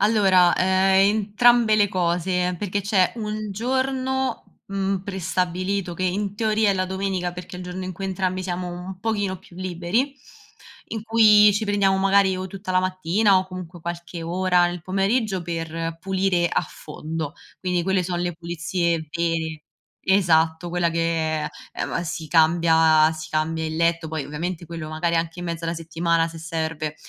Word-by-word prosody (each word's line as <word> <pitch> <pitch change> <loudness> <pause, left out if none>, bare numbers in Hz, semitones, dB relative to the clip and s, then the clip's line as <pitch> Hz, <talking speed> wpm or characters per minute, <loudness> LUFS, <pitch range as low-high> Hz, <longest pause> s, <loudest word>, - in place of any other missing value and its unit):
Allora, 195 -5 +4
ehm, 190 +2 +3
entrambe 220 +2 +4
le 205 -1 +4
cose 180 0 0
perché 200 +1 -2
c'è 190 -2 +2
un 215 -1 -4
giorno, 260 +4 -2
mhmm, 195 -1 -2
prestabilito 185 0 -2
che 185 - -5
in 195 +2 -1
teoria 220 -1 +2
è - - +1
la 185 -1 0
domenica 190 -1 -2
perché 180 +1 -8
è - - -8
il - - -7
giorno 180 +1 -5
in 185 - -4
cui 195 +2 -7
entrambi 185 -1 -1
siamo 180 -1 -3
un 180 +1 -8
pochino 205 -3 -1
più 175 -1 -17
liberi, 185 +9 -1 0.7
in 220 -2 -4
cui 215 -2 +6
ci 215 +2 0
prendiamo 200 -2 +2
magari 195 -1 +3
o 185 - -4
tutta 190 +1 -7
la 185 - +4
mattina 185 +2 +2
o 185 - -3
comunque 180 -2 -9
qualche 170 0 -6
ora 180 +1 +2
nel 175 -1 -5
pomeriggio 195 +2 0
per 165 -1 -4
pulire 190 -1 +1
a - - +1
fondo. 155 0 -6 0.3
Quindi 180 -2 -1
quelle 190 +1 +1
so' 175 0 -3
le 175 0 -2
pulizie 170 0 -2
vere. 165 -2 -2 0.5
Esatto, 165 -3 +3
quella 175 0 +1
che, 165 -2 0
ehm 150 - -3 0.4
m - - -1
si 165 -2 -5
cambia 160 -1 +4
si 155 -1 -7
cambia 160 +1 -1
il 155 - -4
letto, 170 0 +1
poi 155 -2 -4
ovviamente 170 +3 -4
quello 165 -2 -7
magari 165 +2 -1
anche 165 +1 -2
in - - -5
mezzo 170 -1 -4
alla 165 0 -1
settimana 165 0 0
se 165 0 -10
serve, 160 -2 -3
180 Hz, 170 wpm, -23 LUFS, 165-195 Hz, 0.7 s, cui